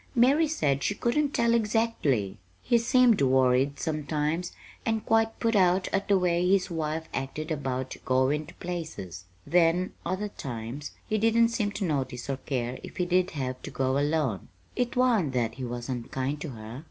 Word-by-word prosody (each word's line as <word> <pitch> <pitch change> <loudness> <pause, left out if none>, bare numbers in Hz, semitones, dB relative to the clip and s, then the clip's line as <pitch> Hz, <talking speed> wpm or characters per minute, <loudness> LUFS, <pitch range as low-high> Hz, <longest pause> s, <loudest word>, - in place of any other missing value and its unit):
Mary 275 +7 +5
said 145 - 0
she 205 - 0
couldn't 280 +7 +1
tell 235 -3 +2
exactly. 210 - +1 0.2
He 235 - +3
seemed 240 - +4
worried, 130 +1 +3
sometimes, 155 +2 -1 0.3
and 225 -1 -1
quite 225 0 +2
put 230 -1 +1
out 185 -1 +3
at 195 0 -1
the 200 - +4
way 180 -1 +1
his 190 -2 +2
wife 160 0 -2
acted 155 +4 -4
about 130 -3 -3
goin' 130 +4 +1
to - - -13
places. 155 - -6 0.2
Then, 175 +1 +2
other 190 +4 -2
times, 125 - -6 0.2
he 215 - 0
didn't 230 +1 +4
seem 225 -3 0
to 200 -1 -2
notice 135 -5 -2
or 135 - -2
care 125 -2 -3
if - - -10
he 180 - +1
did 180 +1 +2
have 130 -2 -3
to - - -7
go 130 +1 0
alone. 145 - 0 0.3
It 245 -1 -1
wa'n't 230 - +2
that 120 -3 0
he 130 - -7
was 120 0 -5
unkind 130 +3 -3
to 160 - -4
her. 115 0 -8
160 Hz, 175 wpm, -28 LUFS, 130-210 Hz, 0.3 s, Mary